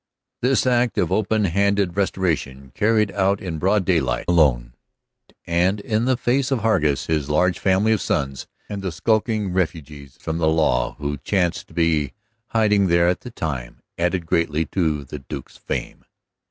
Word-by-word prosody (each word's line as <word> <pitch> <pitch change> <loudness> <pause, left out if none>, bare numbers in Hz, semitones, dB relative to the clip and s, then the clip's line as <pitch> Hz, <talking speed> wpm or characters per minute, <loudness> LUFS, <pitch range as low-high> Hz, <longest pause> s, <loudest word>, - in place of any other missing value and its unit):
This 130 +2 +2
act 125 -2 +2
of - - +1
open 110 0 +1
handed 100 0 +1
restoration, 80 -9 -1
carried 105 -1 +2
out 100 0 +1
in 85 -4 -5
broad 95 +3 +2
daylight 90 -4 +1
alone, 65 -9 +3 0.7
and 90 +4 +1
in 110 +3 -1
the 130 -1 +2
face 130 +2 +1
of 135 -4 0
Hargus, 75 -11 +1
his 75 -3 -1
large 90 +4 +2
family 95 +3 +2
of 110 - +2
sons, 70 -2 -2 0.2
and 100 -1 -5
the 95 -2 -3
skulking 110 +2 0
refugees 75 -6 -3
from 80 +1 -3
the 80 - +2
law 80 -6 +1
who 75 0 -3
chanced 90 +4 -1
to - - -18
be 80 -5 +1 0.3
hiding 105 -4 +2
there 85 0 +3
at 90 0 +1
the 125 - -8
time, 75 - -5
added 90 0 -1
greatly 80 -1 0
to 80 -6 0
the 70 +2 -8
Duke's 65 0 -9
fame. - - -5
90 Hz, 165 wpm, -22 LUFS, 75-105 Hz, 0.7 s, alone